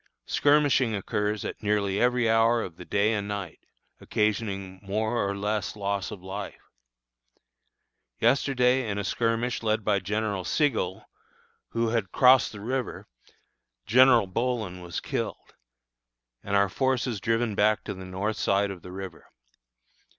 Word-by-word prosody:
Skirmishing 145 -5 +3
occurs 105 +1 -2
at - - -6
nearly 100 -2 0
every 125 -1 +2
hour 115 +1 +3
of 85 - -8
the 90 - -10
day 100 +4 +1
and 100 -2 -2
night, 100 -5 -5 0.4
occasioning 100 -3 -2
more 110 +4 -1
or 100 0 -2
less 105 -1 -2
loss 100 -1 -2
of 100 -4 -9
life. 100 +2 -6 1.6
Yesterday 125 0 +2
in 100 - -2
a 105 - -2
skirmish 115 +3 -1
led 110 -1 0
by 100 -2 +2
General 100 0 -2
Sigel, 110 - 0 0.6
who 115 0 0
had 110 -5 -1
crossed 130 0 +5
the 105 - -9
river, 125 +3 -3 0.8
General 125 0 +6
Bohlen 110 -2 -2
was 90 -1 -5
killed, - - -4 0.9
and 100 - -2
our 100 0 +4
forces 125 -1 -1
driven 115 +2 0
back 110 +1 +2
to - - -5
the 95 -1 -9
north 95 +4 -3
side 100 -1 +1
of 90 -3 -9
the 90 - -10
river. 95 0 -8
105 Hz, 140 wpm, -27 LUFS, 100-115 Hz, 1.6 s, General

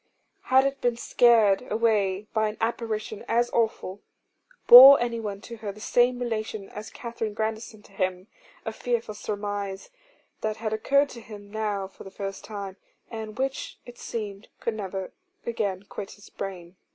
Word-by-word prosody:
Had 265 +1 +5
it 275 0 -2
been 240 -1 +1
scared 235 -2 +4
away 210 -3 +1
by 220 -1 +2
an 210 - -8
apparition 225 -2 -3
as 240 +1 +1
awful? 220 -4 -1 0.6
Bore 265 +3 +12
anyone 225 -4 -3
to 235 +2 -9
her 215 -2 -5
the 205 - -14
same 245 +3 +2
relation 220 -4 -4
as 210 +1 -8
Katherine 230 -3 -5
Grandison 220 0 -4
to - - -19
him? 185 -1 -2 0.4
A 220 - -3
fearful 235 -2 -2
surmise, 205 - -4 0.5
that 215 0 -2
had 220 -1 -3
occurred 280 +6 +2
to 235 - -10
him 205 -2 -11
now 210 -3 -2
for 190 - -14
the 195 - -9
first 195 0 -6
time, 200 -2 -7 0.3
and 220 -1 -6
which 270 +1 -3
it 245 -1 -12
seemed 210 -2 -6
could 230 - -2
never 195 -3 -5 0.3
again 205 -5 -2
quit 200 0 -7
his 205 +2 -16
brain. 185 -2 -7
215 Hz, 160 wpm, -26 LUFS, 200-235 Hz, 0.6 s, Bore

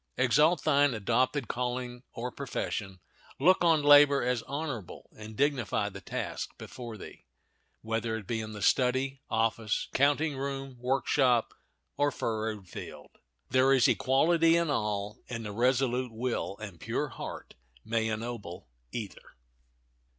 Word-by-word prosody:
Exalt 150 +7 +3
thine 145 -4 +3
adopted 125 +5 +1
calling 125 0 -3
or 125 +1 -5
profession. 105 -8 -4 0.4
Look 180 +6 +4
on 165 -3 +4
labor 145 -1 +7
as 125 -1 0
honorable, 140 - -5
and 110 0 -10
dignify 125 -8 +1
the 100 -1 -10
task - - -5
before 120 -4 -8
thee, - - -12 0.6
whether 115 0 -1
it 110 -3 -6
be 115 +3 -2
in 110 0 -7
the 105 -2 -6
study, 130 +3 +2
office, 115 -1 0
counting 145 +2 +2
room, 135 -1 -4
workshop, 125 -1 +2 0.4
or 145 0 +3
furrowed 110 -5 -3
field. - - -9 0.4
There 130 +2 +5
is 130 -3 +5
equality 165 +5 +3
in 170 -3 +1
all, 105 -3 -2
and 115 -2 -5
the 105 - -4
resolute 125 +2 +1
will 115 -3 -3
and 100 -6 -9
pure - - -2
heart - - -8 0.3
may 110 -1 0
ennoble 110 - -5 0.2
either. 110 -5 -7
125 Hz, 135 wpm, -29 LUFS, 110-140 Hz, 0.6 s, labor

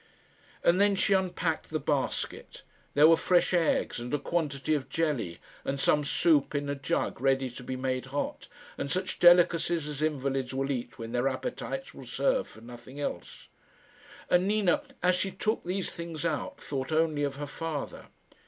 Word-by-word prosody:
And 180 +3 +4
then 205 -1 +4
she 195 - +2
unpacked 180 -3 0
the 155 - -1
basket. 140 -1 -2 0.3
There 150 +2 +8
were 165 - +7
fresh 180 +2 +2
eggs, 165 -7 +1
and 120 +1 -6
a 145 - +2
quantity 150 -3 -1
of 135 -3 -2
jelly, 135 - -1 0.3
and 135 0 -2
some 150 +2 +3
soup 150 0 +2
in 145 0 -1
a - - 0
jug 140 -2 -2
ready 135 -1 +2
to 120 - -10
be 130 - -4
made 130 0 -2
hot, 140 +2 -3 0.3
and 140 - -2
such 185 +4 -2
delicacies 175 -2 +5
as 150 -1 -5
invalids 135 -4 -1
will 135 +1 0
eat 120 -2 -4
when 115 -1 -6
their 125 +2 +1
appetites 250 - -4
will - - -11
serve - - +1
for - - -15
nothing 120 +3 -11
else. 85 - -5 0.8
And 180 +1 +3
Nina, 210 +6 +2 0.2
as 180 0 +5
she 195 +2 0
took 215 +3 -1
these 185 +1 -2
things 170 -2 -6
out, 155 -3 -2
thought 135 0 -4
only 155 -2 +2
of 140 -1 -1
her 145 +1 -4
father. 150 0 -5
150 Hz, 175 wpm, -29 LUFS, 135-175 Hz, 0.8 s, There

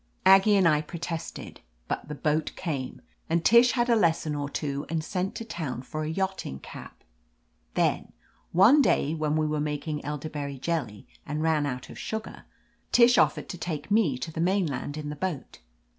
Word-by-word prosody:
Aggie 195 +2 +7
and 190 -3 +5
I 150 -2 +3
protested, 165 +1 -6 0.3
but - - -3
the 150 - -5
boat 150 +2 0
came, 140 -8 -4 0.3
and 165 0 +1
Tish 235 +2 +6
had 240 -1 +1
a 235 - +4
lesson 165 -6 +2
or 145 -1 -3
two 140 -1 -3
and 160 -1 -1
sent 185 +3 -3
to 230 - -5
town 155 - -5
for 155 +4 -5
a 155 - -2
yachting 190 - -3
cap. - - -11 0.7
Then, - - +1 0.4
one 215 - +6
day 155 - +2
when 155 -2 -1
we 155 0 +1
were 150 0 -1
making 150 0 -3
elderberry 145 -1 -5
jelly 130 -8 -3 0.2
and 150 +1 -3
ran 155 -2 +2
out 125 -2 -5
of - - -10
sugar, 220 0 -6 0.5
Tish 245 0 +6
offered - - +2
to 180 - -6
take 160 +1 -5
me 200 - +3
(o - - -7
the 160 - -3
mainland 165 -6 0
in 150 -1 -5
the 150 - -5
boat. 155 -2 -5
155 Hz, 180 wpm, -27 LUFS, 150-190 Hz, 0.7 s, Aggie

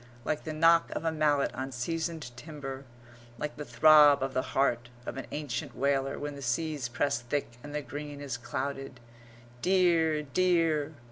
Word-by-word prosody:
like 155 - -2
the 160 - -3
knock 165 +2 +4
of - - -3
a 165 - +2
mallet 150 -3 +2
on 130 +1 -4
seasoned 160 +1 -3
timber, 135 -1 -7 0.5
like 150 +4 -4
the 150 - -6
throb 150 -2 +6
of 135 0 -2
the 130 - +1 0.2
heart 120 -3 +2 0.2
of - - -5
an 135 - -6
ancient 145 -5 -4
whaler 135 0 0
when 145 0 -4
the 140 - -9
seas 140 0 -1
press 125 0 0
thick 120 -1 -3
and 145 +2 -8
the 150 - -2
green 145 0 -7
is 140 -3 -4
clouded. 135 +1 -4 0.6
"Dear, 170 -4 +3
dear!" 160 -2 +1
145 Hz, 165 wpm, -30 LUFS, 135-155 Hz, 0.6 s, throb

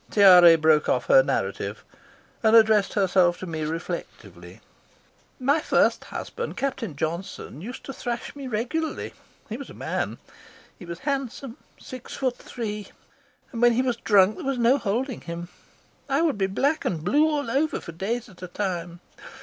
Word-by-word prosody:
Tiare 180 -5 +8
broke 155 -1 +3
off - - +1
her - - +7
narrative - - -3 0.6
and 220 0 +4
addressed 220 -3 +5
herself 185 -3 +3
to - - -7
me 160 -3 -4
reflectively. 165 +2 -7 0.8
"My 280 +5 +2
first - - +2
husband, 475 +1 -6
Captain 250 - -3
Johnson, 160 -1 -5
used 245 +7 -8
to 270 - -7
thrash 240 0 -5
me 280 -2 -7
regularly. 255 +8 -3 0.3
He 225 - -5
was 280 - -9
a - - -11
man. - - -3 0.6
He 180 - -10
was 170 0 -6
handsome, 275 -2 -3 0.2
six 255 -2 -9
foot 255 -2 -1
three, 210 -3 -6 0.6
and 230 - -5
when 240 0 +6
he 250 +3 +1
was 250 -3 -1
drunk 205 -2 +4
there - - -7
was 275 -1 -1
no 245 +4 +3
holding 240 +5 -2
him. 170 +1 -7 0.6
I 275 +4 +2
would 315 -6 +2
be 190 - +2
black 280 +11 0
and 160 -4 -2
blue 295 - +3
all 285 -6 -2
over 295 +4 0
for - - -9
days 220 +8 -3
at 180 -3 -17
a 180 - -6
time. 175 -2 -4
225 Hz, 165 wpm, -25 LUFS, 180-265 Hz, 0.8 s, Tiare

